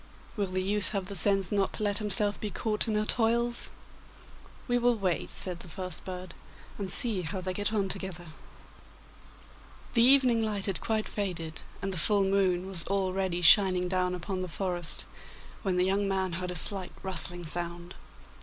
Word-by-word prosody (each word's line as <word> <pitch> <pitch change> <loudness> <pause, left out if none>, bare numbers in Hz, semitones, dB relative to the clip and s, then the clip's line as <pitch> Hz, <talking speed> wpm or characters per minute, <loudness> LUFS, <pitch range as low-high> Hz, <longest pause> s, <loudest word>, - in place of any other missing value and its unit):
'Will 205 -3 -2
the 185 0 -3
youth 205 +1 0
have 195 -2 -2
the 200 - -6
sense 195 0 0
not 200 -2 -1
to - - -2
let 205 -1 0
himself 210 -1 +7
be 210 - -3
caught 215 +2 -1
in 220 - -1
her 210 0 0
toils?' 235 +1 +6 1.0
'We 245 -1 +1
will 245 0 +2
wait,' 185 -4 -2
said 180 -2 -4
the 180 - -12
first 180 -1 -7
bird, 185 -1 -8 0.5
'and 195 -2 -5
see 205 -1 0
how 185 +3 -5
they 185 0 -4
get 205 +3 -2
on 205 -3 -1
together.' 180 -4 -5 1.6
The 230 - +3
evening 250 -2 +4
light 210 -2 -1
had 195 -3 -2
quite 220 -1 -2
faded, 165 -6 -5 0.2
and 195 0 -3
the 180 - -2
full 200 +4 +2
moon 190 -2 0
was 190 -3 +1
already 190 -2 -2
shining 185 0 +5
down 180 0 -1
upon 185 +1 -5
the 185 - -4
forest, 175 -1 -4 0.6
when 190 -3 -2
the 180 - +2
young 195 +1 0
man 190 -1 -1
heard 180 +2 -5
a 180 - -5
slight 185 +2 -3
rustling 175 -2 -3
sound. 170 +2 -4
190 Hz, 180 wpm, -28 LUFS, 180-205 Hz, 1.6 s, himself